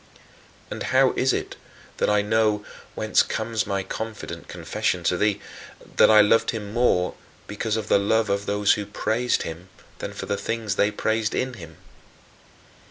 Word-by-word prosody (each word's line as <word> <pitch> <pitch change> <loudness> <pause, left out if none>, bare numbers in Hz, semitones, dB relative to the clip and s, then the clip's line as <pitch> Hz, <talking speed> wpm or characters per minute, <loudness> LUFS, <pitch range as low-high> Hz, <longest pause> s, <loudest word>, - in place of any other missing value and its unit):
And - - -5 0.2
how - - +5
is - - +1
it - - -3 0.4
that - - +1
I 105 -1 +3
know 105 -1 +1 0.3
whence - - +3
comes 110 -4 -2
my 100 -1 -1
confident 100 -4 -6
confession 90 +1 -2
to 90 - +2
thee 105 +2 +1 0.6
that - - +7
I 110 -1 +8
loved 115 +2 +3
him 105 -3 -4
more 110 -7 +2 0.3
because 110 +1 -2
of 110 -2 -4
the 100 - +4
love 110 +2 +2
of 100 0 -1
those 100 0 +3
who 105 -1 -4
praised 120 +3 0
him 85 +3 -8 0.3
than - - -5
for - - -6
the 100 - -2
things 110 -1 -2
they 100 - +3
praised 110 +1 -1
in 130 0 -1
him? 85 -7 -11
105 Hz, 165 wpm, -24 LUFS, 100-110 Hz, 0.6 s, I